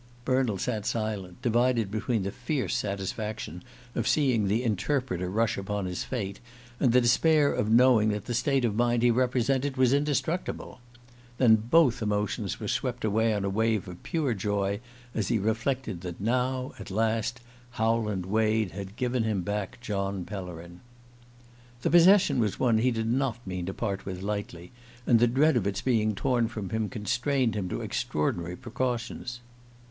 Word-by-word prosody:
Bernald 130 -6 +1
sat 110 -4 -2
silent, 105 -5 -3
divided 120 -3 +2
between 110 0 -1
the 100 - -2
fierce 125 +3 -2
satisfaction 100 -4 -4 0.3
of 115 - -1
seeing 125 -9 +2
the 110 +5 +1
Interpreter 115 -4 -1
rush 110 +2 0
upon 100 0 -3
his 90 -1 -3
fate, 100 -6 -4 0.4
and 125 - +3
the 125 - +6
despair 145 +5 +4
of 105 - -1
knowing 115 -2 +5
that 105 -1 -2
the 120 - -3
state 130 +2 +1
of 105 -3 0
mind 120 0 +2
he 120 - +5
represented 130 +2 +1
was 130 0 +4
indestructible. 150 +1 -1 0.6
Then 120 -4 +6
both 125 +3 +3
emotions 105 -1 -1
were - - -4
swept - - -2
away 110 +2 +2
on 100 -2 -1
a - - 0
wave 110 -1 +1
of 90 -1 -9
pure 150 -7 -1
joy, 100 -1 -1 0.3
as 110 - -1
he 120 - +2
reflected 110 -1 -1
that 90 -2 -6
now, 125 +4 0
at - - -8
last, 110 +3 0 0.3
Howland 110 -4 0
Wade 110 0 +1
had 100 0 -7
given 125 0 0
him 110 -5 0
back 105 +1 -3
John 100 -4 -2
Pellerin. 90 -3 -8 1.0
The - - +1
possession 175 -5 +6
was 105 -4 0
one 115 -4 +3
he 125 +3 +3
did 115 -2 -1
not 125 0 0
mean 90 -2 -4
to 95 - -3
part 100 -4 -3
with 95 -1 -5
lightly; 100 -4 -4 0.3
and 115 - +5
the 120 - +5
dread 140 +5 +3
of 105 -5 +1
its 100 -1 -2
being 110 -4 +1
torn 120 +1 +1
from 110 -4 -6
him 110 -1 -1
constrained 125 +2 0
him 95 -4 -3
to - - -3
extraordinary 85 +3 -2
precautions. 120 0 -4
110 Hz, 165 wpm, -28 LUFS, 100-125 Hz, 1.0 s, the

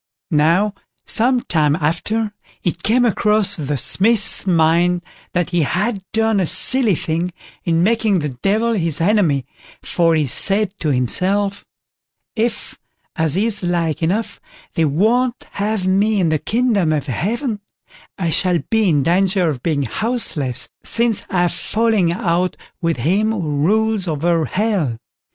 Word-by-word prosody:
Now, 170 +7 +2 0.3
some 245 +2 +4
time 150 -7 +1
after, 205 +8 -1 0.3
it 175 - -2
came 245 +4 +2
across 210 -2 +2
the 145 -3 -3
Smith's 205 - +2
mind 175 +1 +2 0.3
that 180 0 -1
he 175 -1 +1
had 195 - -1
done 220 -1 +1
a 185 - 0
silly 220 +4 +2
thing 165 +3 -2 0.3
in 165 0 +2
making 220 -1 +2
the 150 -3 -2
Devil 210 - 0
his 165 -7 0
enemy, 165 - +2 0.4
for, 165 -2 +1
he 155 -2 +1
said 195 - +1
to 155 - -1
himself: 195 - 0 0.7
"If, 230 +1 -3 0.4
as 160 0 +1
is 215 +1 +1
like 170 -4 -1
enough, 195 +8 -2 0.3
they 165 - +1
won't 230 - +1
have 205 -1 -2
me 200 +3 +2
in 175 -3 +2
the 155 -1 0
kingdom 220 - +1
of 145 -3 -2
Heaven, 215 - -2 0.6
I 170 -4 -1
shall 180 +1 +2
be 220 -3 +3
in 145 -4 +2
danger 185 +2 +2
of 135 -5 -4
being 150 -3 -1
houseless, 155 - -1 0.2
since 230 -2 +2
I've 175 -2 +1
fallen 215 -6 0
out 180 0 -1 0.2
with 165 -3 0
him 195 - +1
who 155 -9 -3
rules 220 -2 +1
over 165 +1 0
Hell." 185 - -1
185 Hz, 140 wpm, -18 LUFS, 160-215 Hz, 0.7 s, some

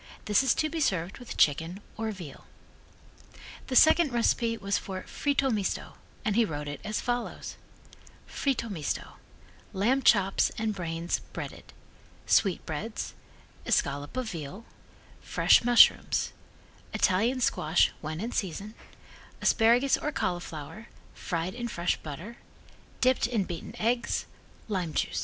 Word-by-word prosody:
This 210 +3 +4
is 265 -3 +3
to 310 - +1
be 325 +1 -4
served 190 - 0
with 245 - -8
chicken 165 +5 +2 0.2
or 220 0 -2
veal. 175 -9 -10 1.2
The 260 - -3
second 315 +1 +6
recipe 230 -1 +1
was 200 -1 -1
for 190 -1 -6
Fritto 275 -2 0
Misto, 205 -4 -2 0.3
and 210 -3 +1
he 235 - +5
wrote 150 -7 -4
it 145 -1 -6
as 215 0 -2
follows: 245 0 -3 0.7
Fritto 270 -4 -1
Misto 165 -9 -4 0.6
"Lamb 235 +8 +2
chops 195 -6 +4
and 220 -1 -1
brains 170 -2 -2
breaded - - -7 0.5
sweetbreads 195 +2 0 0.5
escallop 145 - 0
of 250 -4 -2
veal 170 +6 -7 0.6
fresh - - +4
mushrooms 240 0 +5 0.6
Italian 225 +8 +2
squash 160 -8 +2
when 155 +1 -4
in 230 +3 -3
season 200 +2 -3 0.7
asparagus 240 +4 +4
or 300 - -2
cauliflower 175 - -4 0.3
fried 170 +1 -3
in 240 0 -4
fresh 175 -5 0
butter 170 +11 -8 0.6
dipped 255 -2 +3
in 235 -5 0
beaten 175 -3 -7
eggs 235 +2 0 0.4
lime 180 -7 -2
jus." - - 0
210 Hz, 125 wpm, -28 LUFS, 170-240 Hz, 1.2 s, second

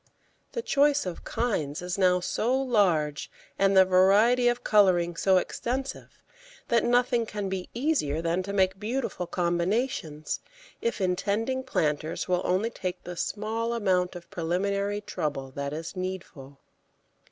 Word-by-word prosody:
The 470 - -3
choice 290 - +3
of 180 -2 -6
kinds 155 -12 -2
is 180 0 -2
now 180 -2 +3
so 245 +8 0
large, 180 - +1 0.3
and 195 0 +4
the 190 - +8
variety 205 +7 +4
of 240 0 +1
colouring 180 -5 +3
so 190 +2 +3
extensive, 260 +8 -4 0.5
that 235 - +3
nothing 245 -1 +2
can 205 -2 -4
be 190 -1 -4
easier 240 - 0
than 170 +2 0
to 195 +2 -5
make 190 -1 +1
beautiful 220 -4 -3
combinations, 175 - -1 0.4
if 235 -3 -1
intending 205 +7 0
planters 155 - -1
will 180 -1 +1
only 195 +6 +1
take 185 -4 -5
the 180 - -7
small 220 +5 -2
amount 185 -5 +1
of 175 -1 -9
preliminary 200 +4 -1
trouble 145 -9 -4
that 140 +1 -4
is 160 +5 -6
needful. 180 -7 -6
190 Hz, 140 wpm, -27 LUFS, 175-230 Hz, 0.5 s, the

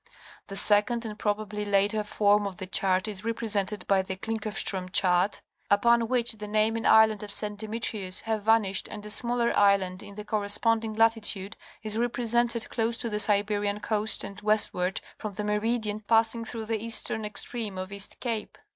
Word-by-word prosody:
The 195 - -8
second 215 +4 +2
and 210 -1 -7
probably 210 0 -2
later 205 +1 +1
form 205 0 +2
of 190 -2 -8
the 190 - -6
chart 185 +1 +1
is 205 -2 -3
represented 210 -3 -1
by 195 -1 +2
the 190 0 -5
Klinckofstrém 215 -3 -2
chart, 180 +2 +1 0.3
upon 230 +3 +3
which 240 -1 +1
the 210 - -6
name 215 +1 +1
and 225 - -1
island 220 -1 +5
of 210 -1 -7
St. 210 0 0
Demetrius 210 -3 -3
have 220 -1 -2
vanished 210 -3 +2
and 210 0 -8
a 210 - -5
smaller 235 +1 +1
island 195 -2 +2
in 200 - -12
the 210 0 -8
corresponding 220 +2 0
latitude 220 -3 0 0.3
is 215 0 -2
represented 235 -1 +1
close 230 0 -1
to 230 - -4
the 210 - -1
Siberian 205 0 +2
coast 215 0 0
and 200 +1 -9
westward 205 -3 +1 0.2
from 210 -2 -6
the 210 - -5
meridian 210 0 -1
passing 225 +2 +2
through 225 -1 -6
the 220 -1 -3
eastern 225 -1 +1
extreme 210 -1 0
of 185 +1 -6
East 200 0 -1
Cape. 230 -4 -4
210 Hz, 175 wpm, -27 LUFS, 200-225 Hz, 0.3 s, island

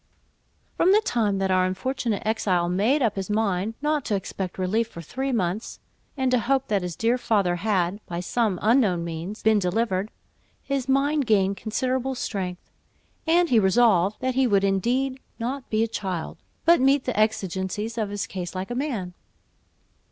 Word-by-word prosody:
From 370 +3 +4
the 425 - +5
time 220 - 0
that 195 0 0
our 185 0 +3
unfortunate 210 +3 -2
exile 190 -6 +1
made 215 +11 +2
up 215 -4 0
his 195 0 -3
mind 210 0 0
not 300 -1 +1
to 210 - 0
expect 190 -1 -4
relief 205 +5 0
for 170 - -11
three 265 - -3
months, 210 -2 -2 0.4
and 260 -1 +1
to 250 - +4
hope 270 +4 0
that 205 -2 +1
his 180 -2 -4
dear 235 +3 +1
father 195 -7 +1
had, 195 0 0
by 170 0 -4
some 205 +1 0
unknown 210 -7 +3
means, 170 +5 -6
been 220 -1 +4
delivered, 195 +1 0 0.5
his 275 -2 -2
mind 280 0 +2
gained 200 -3 +2
considerable 255 +5 -1
strength, 185 -7 -4 0.6
and 340 +1 +4
he 235 - +6
resolved 200 -1 +3
that 260 0 0
he 260 0 +3
would 200 -3 +3
indeed 245 +8 0 0.2
"not 255 +3 -4
be 220 0 +2
a - - 0
child," 190 -6 -4 0.3
but 335 -4 +6
meet 270 +1 +4
the 255 - -2
exigencies 210 0 -1
of 220 -3 -2
his 205 -2 -3
case 185 -1 -6
like 185 +4 -4
a - - -1
man. 240 -9 -3
215 Hz, 175 wpm, -25 LUFS, 190-255 Hz, 0.6 s, he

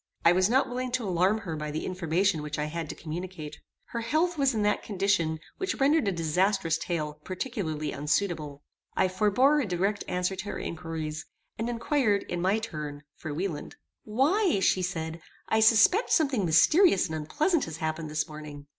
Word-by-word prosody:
I 170 - +8
was 185 +2 +3
not 260 +3 +3
willing 250 0 -3
to 250 -5 -1
alarm 185 +4 +2
her 165 -6 -4
by 150 0 -4
the 155 +1 -3
information 180 -1 0
which 150 0 -4
I 150 - -1
had 160 0 -4
to - - -5
communicate. 165 -1 -7 0.3
Her 235 - -3
health 315 +9 +1
was 275 -5 +2
in 215 - +1
that 210 0 +1
condition 190 -6 0 0.2
which 380 0 -2
rendered 285 -2 +3
a - - +3
disastrous 170 0 +1
tale 155 -4 -3
particularly 185 - -3
unsuitable. 150 -1 -2 0.3
I - - +3
forbore 215 +10 +3
a 240 - -2
direct 195 +3 0
answer 180 +1 -1
to 190 - -5
her 205 - -4
inquiries, 160 -2 -5 0.3
and 230 +2 -1
inquired, 235 -3 +1
in 175 -1 -4
my 190 +4 +2
turn, 150 -9 -6
for 155 - -6
Wieland. 165 0 -4 0.3
"Why," 295 - +2
said 175 -4 0
she, - - -28 0.3
"I 220 - +3
suspect 225 - +5
something 275 - +2
mysterious 200 - +5
and 160 - -5
unpleasant 295 - 0
has 160 -1 -7
happened 160 0 -3
this 155 0 -1
morning. 150 -2 -9
185 Hz, 180 wpm, -28 LUFS, 160-225 Hz, 0.3 s, I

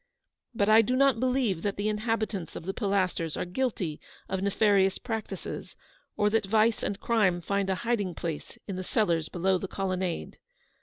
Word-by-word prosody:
But 200 -2 +2
I 215 +1 +8
do 250 +4 0
not 270 -3 +4
believe 250 -8 +1
that 200 +1 -2
the 205 +1 -1
inhabitants 215 -4 -2
of - - -7
the 190 - -2
Pilasters 185 -6 0
are - - -1
guilty 180 - -2 0.3
of 190 0 -2
nefarious 200 -1 +3
practices, 225 -2 -5 0.4
or 210 0 +3
that 220 -2 +1
vice 220 +2 +3
and 200 - -2
crime 205 -7 +2
find 200 +2 -1
a 190 - +2
hiding 205 -7 0
place 165 -4 -5
in 195 -3 -4
the 185 - -3
cellars 170 -6 +1
below 185 +1 +1
the 195 - -4
colonnade. 185 -2 -3
200 Hz, 170 wpm, -28 LUFS, 185-220 Hz, 0.4 s, I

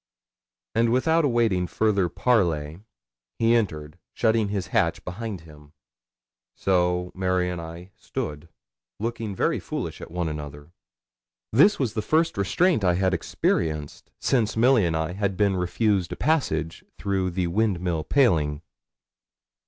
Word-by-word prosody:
And 115 +1 +2
without 160 +7 +3
awaiting 115 -8 +1
further 100 -2 +1
parley, 85 -11 +1 0.6
he 115 0 +3
entered, 80 -8 -1 0.2
shutting 110 -2 +2
his 100 -3 -3
hatch 85 0 +1
behind 100 0 -5
him. 75 -2 -16 0.8
So 90 -1 +1
Mary 90 -1 0
and 90 -1 -5
I 85 +3 -9
stood, 75 +2 -6 0.5
looking 115 -2 -3
very - - +1
foolish - - -5
at - - -8
one 85 0 -2
another. 75 0 -7 0.8
This 195 - +6
was 125 -6 -1
the 110 - -1
first 160 +7 +1
restraint 135 - +2
I 90 -2 +3
had 95 0 +1
experienced 75 -5 -2
since 110 -5 +1
Milly 120 -4 +4
and 80 -1 0
I 80 +2 -2
had 100 -1 -2
been 100 -2 +2
refused 95 +1 0
a - - -5
passage 80 - -1
through 95 -2 -1
the 90 0 -1
Windmill 90 -4 0
paling. 80 - +2
95 Hz, 135 wpm, -25 LUFS, 85-110 Hz, 0.8 s, This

